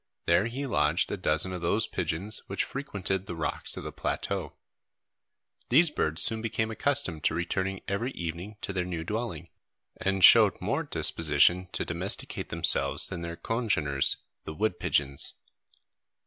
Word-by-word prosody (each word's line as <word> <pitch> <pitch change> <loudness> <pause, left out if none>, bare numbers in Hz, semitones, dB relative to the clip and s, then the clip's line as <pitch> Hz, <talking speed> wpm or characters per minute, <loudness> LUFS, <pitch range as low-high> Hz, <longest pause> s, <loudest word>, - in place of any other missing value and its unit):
There 90 +6 +3
he 130 +4 -4
lodged 75 - +1
a - - -1
dozen 80 +5 +1
of 90 - -5
those 100 +6 +2
pigeons 90 +6 0
which - - -1
frequented 100 -8 -3
the 85 - -5
rocks 80 - -2
of - - -6
the - - -6
plateau. - - -3 1.2
These 150 +6 +5
birds 80 - 0
soon 110 -1 -1
became 110 0 -1
accustomed 110 - -1
to 80 - +2
returning 95 +3 -2
every 105 +6 -1
evening 85 +5 -6
to 100 - -4
their 90 -1 -1
new 85 -2 -4
dwelling, 105 -3 -4 0.5
and 95 -1 -1
showed - - +8
more - - -1
disposition 85 +4 +2
to - - -1
domesticate - - -2
themselves - - +2
than 85 - -5
their 85 0 -5
congeners, 90 - +1 0.3
the 80 - -7
wood 105 -1 -1
pigeons. 70 -1 0
90 Hz, 150 wpm, -28 LUFS, 80-110 Hz, 1.2 s, showed